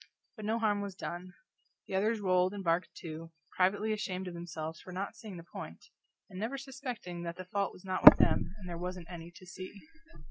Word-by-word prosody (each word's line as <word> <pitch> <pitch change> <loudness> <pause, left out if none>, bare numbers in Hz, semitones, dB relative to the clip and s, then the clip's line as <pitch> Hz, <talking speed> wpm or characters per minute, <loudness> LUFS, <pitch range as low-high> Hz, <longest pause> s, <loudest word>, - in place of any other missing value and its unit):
But 215 -3 -7
no 220 +2 +1
harm 210 -3 +2
was 200 -2 -5
done; 180 +1 -6 0.5
the - - -8
others 215 +4 +2
rolled 185 0 +3
and 200 - -5
barked 170 +1 +2
too, 165 0 -7 0.2
privately 205 +4 +3
ashamed 190 -3 -3
of 180 - -5
themselves 165 -2 -5
for 185 - -10
not 190 +2 -3
seeing 210 -5 -8
the 170 - -8
point, 85 - -9 0.4
and 185 - -8
never 230 +6 -2
suspecting 255 -10 -6
that 170 0 -4
the 185 +1 -7
fault 200 +2 0
was 180 - -14
not 185 -1 -1
with - - +14
them - - +3
and 190 -3 -9
there 170 -1 -4
wasn't 180 -1 -5
any 170 -1 -7
to 185 - -12
see. 185 +2 -8
185 Hz, 210 wpm, -33 LUFS, 175-205 Hz, 0.5 s, with